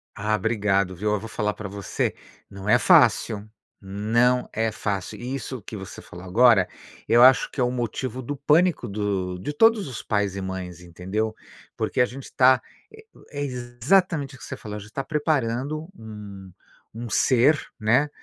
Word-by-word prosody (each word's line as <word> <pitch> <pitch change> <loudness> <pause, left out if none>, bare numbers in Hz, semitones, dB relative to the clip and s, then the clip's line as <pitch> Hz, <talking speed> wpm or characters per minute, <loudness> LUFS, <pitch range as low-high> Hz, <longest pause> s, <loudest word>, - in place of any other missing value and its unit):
Ah, 105 +2 0
obrigado, 100 -4 0
viu? 105 +4 -1
Eu 105 - 0
vou 110 +3 -8
falar 105 -1 -1
pra 105 -1 -7
você. 100 0 -2 0.4
Não 100 0 -9
é 120 +3 +5
fácil. 110 -3 +4 0.3
Não 115 +6 +1
é 110 0 0
fácil. 100 -3 -4
Isso 130 0 -5
que 105 - -8
você 95 -1 -9
falou 90 +1 -11
agora, 110 0 +5 0.4
eu 120 - +5
acho 130 +1 +6
que - - -8
é - - +3
o 120 - +2
motivo 125 +1 -3
do 145 +4 -4
pânico 155 +5 +2
do 100 -3 -2
de 95 +11 -5
todos 225 +4 +4
os 125 -4 -6
pais 100 -2 -1
e 100 - -4
mães, 95 -2 -6
entendeu. 95 +6 -3 0.4
Porque - - 0
a - - +5
gente 130 +2 -10
tá, 130 0 +5 0.3
eh, 440 0 -15 0.3
é, 145 -1 -5
exatamente 135 +5 0
o - - -16
que - - -13
você - - -7
falou, 105 -1 -7
a - - -6
gente 105 +1 -12
tá 135 - -2
preparando 145 0 -1
um 105 -3 -10 0.4
um 120 +1 -6
ser, 135 +6 +4 0.2
né, 125 +7 +3
115 Hz, 180 wpm, -24 LUFS, 100-130 Hz, 0.4 s, acho